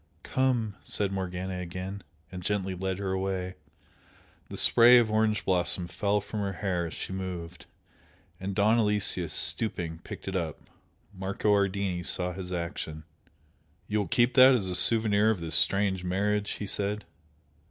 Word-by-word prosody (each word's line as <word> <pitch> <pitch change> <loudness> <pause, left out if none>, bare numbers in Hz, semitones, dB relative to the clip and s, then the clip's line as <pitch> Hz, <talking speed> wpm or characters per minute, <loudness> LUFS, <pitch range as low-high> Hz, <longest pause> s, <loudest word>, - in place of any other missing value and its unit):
"Come!" 120 -6 -1
said 100 -2 -2
Morgana 95 -1 -4
again, 90 +3 -6 0.3
and 90 -1 -7
gently 95 0 -2
led 95 0 -3
her 100 -1 -3
away. 95 -1 -3 1.0
The - - -5
spray 120 +1 +7
of 115 -3 +2
orange 110 0 +1
blossom 90 -1 +2
fell 100 +3 -1
from 105 +2 -6
her 100 -1 -2
hair 90 -3 -2
as 80 - -8
she - - -5
moved, 90 -2 -7 0.7
and 95 +1 -5
Don 105 +3 +3
Aloyslus, 105 -2 +1
stooping, 85 -7 +1
picked - - -10
it 95 - -3
up. 85 -4 -3 0.5
Marco 100 +2 -1
Ardini 100 -3 0
saw 90 0 -1
his 90 0 -7
action. 85 -3 -5 0.8
"You 105 - 0
will 100 - -2
keep 120 +1 +2
that 130 0 +7
as 105 -6 -1
a 90 -1 -1
souvenir 110 0 +4
of 110 -4 0
this 80 -1 -4
strange 95 -2 +3
marriage?" 105 +3 -1
he 105 - -6
said. 100 +1 -2
95 Hz, 155 wpm, -28 LUFS, 90-105 Hz, 1.0 s, spray